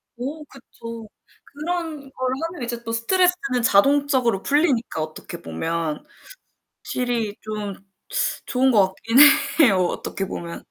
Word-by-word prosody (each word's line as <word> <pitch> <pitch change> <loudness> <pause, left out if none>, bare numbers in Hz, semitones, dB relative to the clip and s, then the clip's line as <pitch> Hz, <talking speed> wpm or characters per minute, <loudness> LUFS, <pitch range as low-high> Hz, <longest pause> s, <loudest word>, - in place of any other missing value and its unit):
어 285 +6 -6
그쵸. 230 -4 -11 0.4
그런 325 +1 -4
걸 255 0 -2 0.2
하면 280 - -7
이제 235 0 -4
또 230 - -5
스트레스는 330 +1 +1
자동적으로 255 -2 +3
풀리니까 280 - +1
어떻게 155 0 -7
보면. 155 - -3 0.8
확실히 235 -4 -2
좀 210 -2 -5 0.7
좋은 260 +1 +2
것 205 -4 +5
같긴 230 +3 -1 0.4
해요, 235 -11 +6
어떻게 195 - -4
보면. 170 -2 -6
240 Hz, 260 characters per minute, -22 LUFS, 205-285 Hz, 0.8 s, 해요